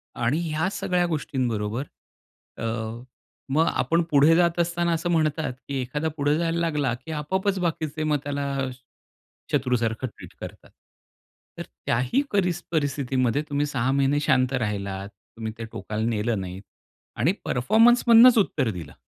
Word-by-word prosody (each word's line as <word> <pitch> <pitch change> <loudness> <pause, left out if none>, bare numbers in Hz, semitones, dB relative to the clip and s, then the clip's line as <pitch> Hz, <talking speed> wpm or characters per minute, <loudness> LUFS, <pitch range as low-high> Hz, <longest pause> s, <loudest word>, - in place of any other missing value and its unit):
आणि 120 +7 0
ह्या 155 +4 0
सगळ्या 180 -3 0
गोष्टींबरोबर 125 -7 -2 0.7
अ, - - -6 0.9
मग 160 +3 +3
आपण 170 +1 +1
पुढे 150 +3 +6
जात 170 0 +2
असताना 170 0 +1
असं 165 +2 -1
म्हणतात, 155 -4 +1
की 140 - -4
एखादा 150 +5 -2
पुढे 145 +1 +2
जायला 170 0 0
लागला 150 -7 0
की 130 +6 -10
आपोआपच 190 +6 -1
बाकीचे 155 -3 -2
मग 150 -1 +2
त्याला 140 -1 -2 0.8
शत्रूसारखं 125 -3 0
ट्रीट 110 - -13
करतात. - - -9 0.9
तर - - -4 0.2
त्याही 125 - +1
परि 190 -3 +2 0.2
परिस्थितीमध्ये 140 -4 0
तुम्ही 145 0 0
6 130 -3 0
महिने 140 +1 +2
शांत 130 -2 +2
राहिलात, 100 -5 -3
तुम्ही 110 +3 -9
ते 115 - -5
टोकाला 110 +1 -3
नेलं 110 -1 -1
नाही 95 +1 -7 0.6
आणि 135 +11 +3
परफॉर्मन्स 225 - +4
मधनच 235 +1 +8
उत्तर 145 - +2
दिलं. 85 -7 -8
145 Hz, 140 wpm, -25 LUFS, 120-165 Hz, 0.9 s, मधनच